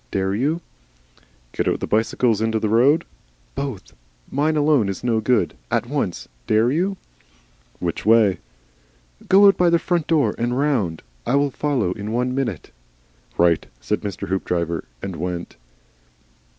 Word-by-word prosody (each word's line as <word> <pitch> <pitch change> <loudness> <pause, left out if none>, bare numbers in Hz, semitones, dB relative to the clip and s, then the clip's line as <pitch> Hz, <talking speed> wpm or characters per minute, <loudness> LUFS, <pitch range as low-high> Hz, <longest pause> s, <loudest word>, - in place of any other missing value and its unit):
Dare 95 +4 -1
you? 145 +10 0 0.9
"Get - - -2
your - - +1
bicycle 115 +3 +1
out 110 - -1
in 110 - +1
the 110 -1 0
road?" 125 +9 +4 0.5
"Both. 135 -7 -5 0.4
Mine 155 +3 +1
alone 145 -8 +3
is 95 - -5
no 115 -2 +1
good. 125 +3 +1 0.2
At - - 0
once. 130 -9 -3 0.2
Dare 110 +3 +3
you?" 185 +6 0 0.8
"Which 85 -2 -3
way?" 110 -3 +4 0.9
"Go 195 +2 +7
out 195 -2 +6
by 175 -1 +4
the 170 - +4
front 170 -1 -1
door 145 -10 +2
and 120 +1 0
round. 120 - 0 0.2
I 135 - +2
will 140 0 +2
follow 130 -10 0
in 105 +3 -5
one 125 +2 0
minute." 120 - -3 0.7
"Right!" 85 -1 +3
said - - -2
Mr. 100 -3 -5
Hoopdriver, 85 -3 -1 0.2
and 95 -4 -5
went. 90 +1 -4
115 Hz, 150 wpm, -22 LUFS, 100-145 Hz, 0.9 s, Go